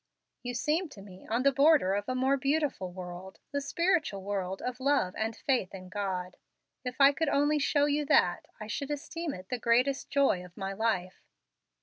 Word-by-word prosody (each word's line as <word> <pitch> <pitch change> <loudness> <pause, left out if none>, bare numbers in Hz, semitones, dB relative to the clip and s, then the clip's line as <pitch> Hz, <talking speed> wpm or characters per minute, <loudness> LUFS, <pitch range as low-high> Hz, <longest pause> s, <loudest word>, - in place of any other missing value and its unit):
You 245 0 -5
seem 305 +7 0
to 210 - -12
me 190 -2 -13
on 235 +3 0
the 275 - +5
border 275 -7 +4
of 205 +2 -2
a 255 - -1
more 260 +2 +2
beautiful 275 - -1
world, 180 +1 -8
the 285 - -1
spiritual 320 - 0
world 190 -1 -3
of 250 0 -4
love 265 -9 +2
and 220 0 -2
faith 245 -10 -1
in 185 -1 -10
God. 185 -2 -3 0.5
If 250 -1 -4
I 275 0 +8
could 315 +1 -1
only 290 +2 +2
show 285 +1 +2
you 295 +1 +1
that, 175 -9 +3
I 215 - -6
should 270 +6 -4
esteem 320 +2 -4
it 185 +1 -11
the 250 - -2
greatest 250 +4 +2
joy 275 -10 +2
of 180 -1 -15
my 195 -1 -3
life." 195 -4 -1
250 Hz, 195 wpm, -30 LUFS, 190-285 Hz, 0.5 s, I